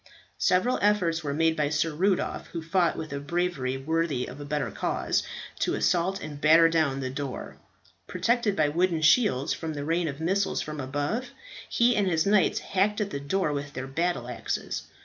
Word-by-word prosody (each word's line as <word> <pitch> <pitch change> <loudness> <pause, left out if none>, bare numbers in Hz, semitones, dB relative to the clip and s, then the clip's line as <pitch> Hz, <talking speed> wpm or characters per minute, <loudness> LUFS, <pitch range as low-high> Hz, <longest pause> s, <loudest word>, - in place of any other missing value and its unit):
Several 185 +8 +2
efforts 180 -6 +2
were 145 - -2
made 160 +2 +2
by 150 -2 0
Sir 155 +2 0
Rudolph, 185 +4 0
who 165 -2 -6
fought 170 +1 +1
with 155 -3 -5
a 140 - -3
bravery 145 -4 -1
worthy 155 -2 -1
of 135 +4 -9
a - - -6
better 150 0 -2
cause, - - -1 0.4
to - - 0
assault 185 +3 +1
and 145 -1 -8
batter 165 +2 +7
down 155 -5 +1
the 130 -1 -3
door. 140 -2 -6 0.5
Protected 215 +3 +1
by 155 -4 +3
wooden 170 0 +1
shields 160 - +4
from 160 -2 -5
the 145 0 -4
rain 165 +2 0
of 140 -1 -5
missiles 190 +5 0
from 150 -1 -5
above, 145 - -2 0.4
he 240 +1 +3
and 205 -2 +2
his 160 -3 +1
knights 200 -1 +3
hacked 200 +2 0
at 205 -2 -2
the 140 - -3
door 150 +2 0
with 145 0 -4
their 130 +1 -4
battle 135 -2 -1
axes. 125 - -3
160 Hz, 190 wpm, -27 LUFS, 145-185 Hz, 0.5 s, batter